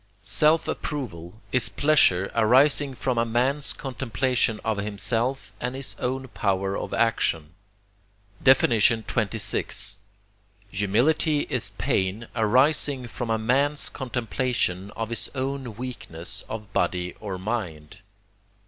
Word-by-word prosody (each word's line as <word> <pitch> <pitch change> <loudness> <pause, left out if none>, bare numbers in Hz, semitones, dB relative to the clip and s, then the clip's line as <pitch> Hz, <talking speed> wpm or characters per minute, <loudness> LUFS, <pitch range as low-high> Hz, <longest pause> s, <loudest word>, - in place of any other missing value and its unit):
Self 150 +12 +3
approval 110 - -5
is 125 - +2
pleasure 100 -11 +3
arising 135 +4 +3
from 125 -1 -1
a - - +3
man's 125 +5 +1
contemplation 125 -2 -1
of 110 -2 0
himself 115 +5 -1
and 125 +1 -2
his 135 -1 -4
own 130 +1 -2
power 100 -3 -1
of - - -4
action. 85 -9 0 0.9
XXVI. 110 -4 +2 0.7
Humility 125 +10 +2
is - - +1
pain 95 +5 -1
arising 130 +3 +2
from 120 0 -5
a 110 - +2
man's 140 +6 +1
contemplation 120 -6 -2
of 115 0 -3
his 115 - -2
own 130 -3 -3
weakness 110 -9 -6
of 105 -2 -7
body 90 -1 0
or 100 -3 -5
mind. 90 -7 -4
115 Hz, 110 wpm, -25 LUFS, 100-130 Hz, 0.9 s, Self